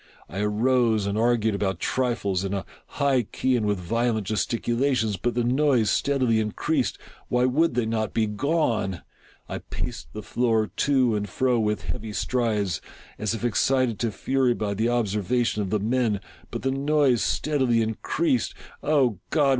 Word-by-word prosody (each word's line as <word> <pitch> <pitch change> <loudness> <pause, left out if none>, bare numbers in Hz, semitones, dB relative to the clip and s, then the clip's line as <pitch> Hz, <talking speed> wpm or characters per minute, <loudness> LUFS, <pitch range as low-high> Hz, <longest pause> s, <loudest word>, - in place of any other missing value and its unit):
I 95 - -6
arose 110 +1 +2
and 100 0 -1
argued 110 -1 +2
about 95 -3 -1
trifles, 115 -7 0
in 100 0 -2
a 95 - -3 0.3
high 140 -3 +3
key 130 +3 -1
and 110 -3 0
with 105 -1 +1
violent 110 +4 0
gesticulations, 115 +2 0
but 120 +6 -2
the 120 - +1
noise 125 -2 +2
steadily 130 -5 +2
increased. 105 -1 -1 0.3
Why 125 0 +2
would 140 +2 +2
they 120 -2 +1
not 110 -1 -1
be 110 - +1
gone? 110 - 0 0.4
I - - -4
paced - - -6
the 105 - -6
floor 115 -3 +1
to 130 -5 +3
and 105 -1 -2
fro 125 -2 +1
with 105 -1 0
heavy 110 -3 -5
strides, 105 -9 0 0.4
as 110 +1 -1
if 115 - -4
excited 120 0 +1
to 115 -2 0
fury 130 +4 +1
by 105 -2 -2
the 110 +4 0
observation 115 0 0
of 100 - -2
the 105 +2 +1
men 110 -1 +1 0.2
— - - -25
but - - -5
the 135 - +1
noise 140 -3 +2
steadily 130 -6 +1
increased. 120 +4 -1 0.3
fOh 130 - +2
God! 145 -3 +3
115 Hz, 165 wpm, -25 LUFS, 105-130 Hz, 0.4 s, high